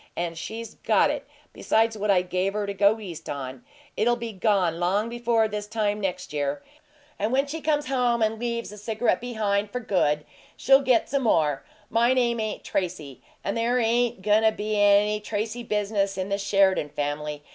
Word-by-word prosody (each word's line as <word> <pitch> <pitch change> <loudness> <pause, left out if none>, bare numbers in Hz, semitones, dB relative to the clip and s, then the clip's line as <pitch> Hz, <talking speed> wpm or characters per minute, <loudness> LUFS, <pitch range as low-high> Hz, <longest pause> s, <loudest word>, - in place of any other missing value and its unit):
And 170 -1 -2
she's 225 +6 -6
got - - +3
it, - - -5 0.3
besides 225 0 +1
what 210 0 -3
I 185 -2 +4
gave 185 +2 -1
her 210 0 -1
to 200 - -3
go 205 +2 +3
East 170 -6 -8
on. 130 -3 -6 0.3
It'll 240 +2 +2
be 235 -1 -5
gone 185 -4 +1
long 200 +6 +1
before 235 -2 +1
this 210 -1 -5
time 210 -1 -1
next 180 -3 -3
year, 145 -1 -2 0.6
and 210 +3 0
when 270 +2 +2
she 310 +3 -6
comes 295 -1 +1
home 245 -4 +1
and 220 0 0
leaves 235 -1 -3
the 210 - -10
cigarette 220 +3 0
behind 210 -4 -1
for 250 - -3
good 150 -9 0 0.3
she'll 270 +1 +5
get 255 -4 +2
some 275 0 0
more. 155 - +2 0.3
MY 235 +3 +3
name 240 -2 +1
ain't 215 -1 -3
Tracy, 165 -8 -4 0.2
and 200 - -2
there 235 +2 +1
ain't 235 -3 +1
goin' 210 +1 +4
to 220 0 +4
be 215 0 -3
any 205 +1 +4
Tracy 215 +3 -3
business 205 -3 -1
in 190 +1 -3
the 200 0 -1
Sheridan 195 -6 +2
family. 145 +1 -4
210 Hz, 190 wpm, -25 LUFS, 185-230 Hz, 0.6 s, she'll